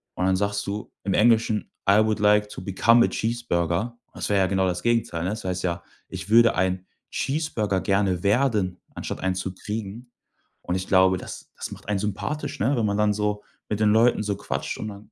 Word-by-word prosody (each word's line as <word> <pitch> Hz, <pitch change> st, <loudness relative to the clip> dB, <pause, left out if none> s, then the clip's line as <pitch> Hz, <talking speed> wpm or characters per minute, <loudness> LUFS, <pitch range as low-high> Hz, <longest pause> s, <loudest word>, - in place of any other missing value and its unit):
Und 90 Hz, -, -1 dB
dann 95 Hz, 0 st, +3 dB
sagst 100 Hz, +1 st, -1 dB
du 100 Hz, +2 st, -5 dB
im 100 Hz, -, -1 dB
Englischen: 110 Hz, -1 st, +3 dB, 0.2 s
„I 100 Hz, +2 st, +6 dB
would 110 Hz, 0 st, 0 dB
like 105 Hz, 0 st, +4 dB
to -, -, -8 dB
become 115 Hz, +6 st, +4 dB
a -, -, -1 dB
cheeseburger.“ 110 Hz, -2 st, -1 dB, 0.2 s
Das -, -, -4 dB
wär 100 Hz, -, +3 dB
ja 95 Hz, -1 st, +3 dB
genau 95 Hz, 0 st, +1 dB
das 90 Hz, -1 st, -2 dB
Gegenteil, 115 Hz, -8 st, 0 dB
ne? -, -, 0 dB
Das 110 Hz, -, -5 dB
heißt 90 Hz, 0 st, -2 dB
ja: 85 Hz, -1 st, -2 dB, 0.2 s
„Ich 100 Hz, -, -7 dB
würde 115 Hz, +1 st, +6 dB
ein 95 Hz, 0 st, 0 dB, 0.2 s
Cheeseburger 115 Hz, -, -1 dB
gerne 95 Hz, -3 st, +1 dB
werden“, 105 Hz, -4 st, +1 dB, 0.2 s
anstatt -, -, -5 dB
einen 95 Hz, 0 st, 0 dB
zu 95 Hz, 0 st, -4 dB
kriegen. 110 Hz, +4 st, -6 dB, 0.5 s
Und -, -, -2 dB
ich 95 Hz, 0 st, -3 dB
glaube, 95 Hz, -1 st, +4 dB
das -, -, -9 dB
das -, -, -6 dB
macht -, -, -11 dB
einen 105 Hz, -2 st, +1 dB
sympathisch, 105 Hz, +9 st, -3 dB
ne, 130 Hz, +8 st, +2 dB
wenn 115 Hz, -, +1 dB
man 100 Hz, -1 st, 0 dB
dann 105 Hz, 0 st, +3 dB
so 105 Hz, 0 st, -1 dB, 0.3 s
mit 105 Hz, -, -1 dB
den 105 Hz, -1 st, +4 dB
Leuten 115 Hz, 0 st, +4 dB
so 100 Hz, -1 st, -1 dB
quatscht -, -, -4 dB
und 110 Hz, -, -4 dB
dann, 100 Hz, 0 st, -12 dB
105 Hz, 210 wpm, -24 LUFS, 95-110 Hz, 0.5 s, I